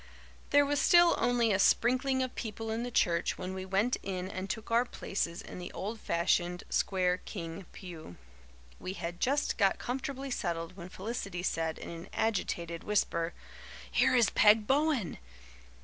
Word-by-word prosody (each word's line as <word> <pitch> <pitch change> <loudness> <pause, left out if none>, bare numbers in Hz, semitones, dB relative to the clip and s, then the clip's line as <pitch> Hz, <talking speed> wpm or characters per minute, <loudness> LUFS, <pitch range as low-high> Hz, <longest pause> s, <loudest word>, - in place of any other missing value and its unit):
There 285 0 +5
was 290 0 +1
still 345 -1 +6
only 240 -2 +2
a 190 - +2
sprinkling 255 +5 +3
of 255 - -4
people 225 0 -5
in 225 +1 -1
the 245 - -3
church 170 -7 +1
when 185 +1 -5
we 190 0 -5
went 200 +6 +1
in 185 -1 -4
and 190 +1 -5
took 220 +1 -5
our 235 +1 +5
places 190 -7 -3
in - - -9
the 175 - -6
old 220 +3 -4
fashioned, 175 0 0
square 180 -2 +1
King 170 -1 -7
pew. 165 - -10 0.6
We 185 - -5
had 175 -2 -5
just 280 +2 +1
got 195 -2 +4
comfortably 270 +2 -4
settled 170 -6 -3
when 180 -2 -9
Felicity 195 -2 -5
said 165 -3 -1
in - - -8
an 165 0 -9
agitated 170 -6 -1
whisper, 170 -5 0 0.6
"Here - - +3
is 235 -4 +4
Peg 210 0 +5
Bowen!" 275 - +1
200 Hz, 165 wpm, -31 LUFS, 175-245 Hz, 0.6 s, still